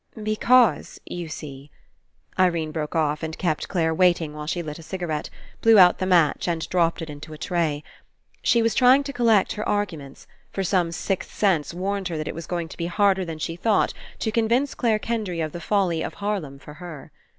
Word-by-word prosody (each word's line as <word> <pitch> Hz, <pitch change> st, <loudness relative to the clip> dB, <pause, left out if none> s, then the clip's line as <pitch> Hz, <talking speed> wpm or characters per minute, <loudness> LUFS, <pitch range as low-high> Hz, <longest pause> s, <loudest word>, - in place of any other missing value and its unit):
"Because, 225 Hz, +2 st, +3 dB
you 175 Hz, -1 st, -6 dB
see 145 Hz, -2 st, -8 dB, 0.2 s
— -, -, -45 dB
" -, -, -21 dB
Irene 170 Hz, -4 st, +2 dB
broke 155 Hz, -1 st, -4 dB
off 150 Hz, -2 st, +1 dB
and 160 Hz, 0 st, -5 dB
kept 155 Hz, -4 st, -1 dB
Clare 160 Hz, -3 st, 0 dB
waiting 170 Hz, -3 st, +2 dB
while 150 Hz, 0 st, -7 dB
she 175 Hz, +2 st, -2 dB
lit 150 Hz, 0 st, -7 dB
a -, -, -9 dB
cigarette, 165 Hz, -3 st, -4 dB, 0.3 s
blew 225 Hz, -1 st, +6 dB
out 180 Hz, -2 st, +7 dB
the 185 Hz, -, -1 dB
match, 170 Hz, -4 st, +3 dB
and 165 Hz, -2 st, -1 dB
dropped 170 Hz, -2 st, +1 dB
it 160 Hz, -, -7 dB
Into 150 Hz, +2 st, -9 dB
a -, -, -9 dB
tray. 160 Hz, -2 st, -1 dB, 0.6 s
She 235 Hz, -1 st, +3 dB
was 230 Hz, -, +2 dB
trying 260 Hz, +2 st, +5 dB
to 280 Hz, 0 st, -6 dB
collect 225 Hz, -6 st, +3 dB
her 210 Hz, -, -3 dB
arguments, 165 Hz, -10 st, -3 dB, 0.2 s
for 195 Hz, -, -3 dB
some 180 Hz, -2 st, +1 dB
sixth 190 Hz, +2 st, -3 dB
sense 180 Hz, -8 st, +1 dB
warned 190 Hz, +2 st, -2 dB
her 165 Hz, -3 st, -4 dB
that 155 Hz, -, -4 dB
It -, -, -3 dB
was 165 Hz, +1 st, -8 dB
going 170 Hz, -2 st, -3 dB
to -, -, -11 dB
be 170 Hz, -, -2 dB
harder 190 Hz, +1 st, +2 dB
than 165 Hz, -3 st, -6 dB
she 165 Hz, +2 st, -4 dB
thought 210 Hz, +4 st, +1 dB, 0.2 s
to 220 Hz, -, -2 dB
convince 235 Hz, +5 st, +1 dB
Clare 225 Hz, -4 st, +1 dB
Kendry 215 Hz, -6 st, -3 dB
of 155 Hz, -1 st, -2 dB
the 170 Hz, -, -7 dB
folly 185 Hz, -6 st, +1 dB
of -, -, -4 dB
Harlem 200 Hz, -9 st, -3 dB
for 150 Hz, +2 st, -12 dB
her. 165 Hz, -5 st, -9 dB
175 Hz, 210 wpm, -24 LUFS, 160-205 Hz, 0.6 s, out